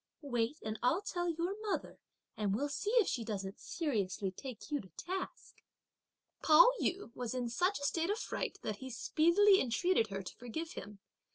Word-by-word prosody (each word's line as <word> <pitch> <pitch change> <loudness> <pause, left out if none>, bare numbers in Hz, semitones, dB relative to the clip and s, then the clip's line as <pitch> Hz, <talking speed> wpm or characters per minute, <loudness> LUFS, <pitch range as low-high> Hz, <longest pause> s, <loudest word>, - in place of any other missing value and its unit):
wait 245 0 0
and 215 0 -4
I'll 315 +11 +2
tell 350 -3 -1
your 340 +3 -1 0.2
mother - - -3 0.4
and 205 -2 0
we'll 285 +6 -1
see 285 +8 -2
if 460 -6 +5
she 240 - -1
doesn't 200 -3 -4
seriously 205 - -1
take 255 +7 -9
you 290 -2 0
to 190 - -15
task." 380 +7 -5 0.8
Pao 330 +11 +8
yü 360 -10 -1
was 245 0 -3
in 250 -1 -1
such 360 - +1
a - - -8
state 330 +4 0
of 415 - +1
fright - - -3
that 210 - -2
he 260 +3 -7
speedily 340 - +4
entreated 250 +1 +2
her 195 -1 -4
to - - -8
forgive 315 +8 -5
him. 205 0 -8
275 Hz, 180 wpm, -34 LUFS, 220-350 Hz, 0.8 s, Pao